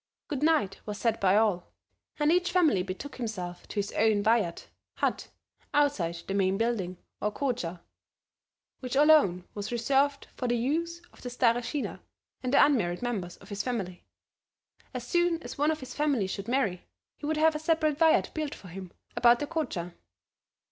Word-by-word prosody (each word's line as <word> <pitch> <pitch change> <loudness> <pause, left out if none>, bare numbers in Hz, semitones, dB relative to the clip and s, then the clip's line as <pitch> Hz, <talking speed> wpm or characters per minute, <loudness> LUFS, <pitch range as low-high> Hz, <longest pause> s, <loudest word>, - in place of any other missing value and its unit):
Goodnight 295 -8 +1
was 210 -1 -4
said 225 0 0
by 195 +1 +4
all, 205 -5 +1 0.4
and 300 0 +3
each 360 +1 +2
family 325 - +3
betook 195 +10 -6
himself 185 -8 -5
to - - -9
his 205 0 -1
own 215 -1 +2
vayat 215 -6 +1 0.3
(hut) - - -1 0.5
outside 175 -14 +1
the 195 - -3
main 195 -1 +2
building 210 -6 -1 0.2
or 210 - 0
Koutcha, 210 -10 -3 1.0
which 255 0 -4
alone 280 - +5
was 205 +1 -5
reserved 275 +4 +1
for 250 - -3
the 240 0 +1
use 335 +8 -1
of - - -18
the 250 - -5
Stareshina 245 +2 0 0.4
and 255 - -2
the 280 - +7
unmarried 205 -10 0
members 200 -8 -3
of - - -16
his 200 -1 -3
family. 200 -8 -4 0.9
As 250 -2 -5
soon 345 +3 +1
as - - -8
one 295 +1 +3
of 315 -2 -1
his 260 - -8
family 285 -8 +1
should 195 +1 -5
marry, 235 -8 0 0.3
he 295 - -6
would 315 0 0
have 315 +1 +4
a 305 - -3
separate 315 -2 +1
vayat 325 -1 +4
built 305 -2 -3
for 185 - -13
him 185 0 -8 0.2
about 240 0 +6
the 290 - -3
Koutcha. 285 - -3
240 Hz, 170 wpm, -29 LUFS, 195-295 Hz, 1.0 s, the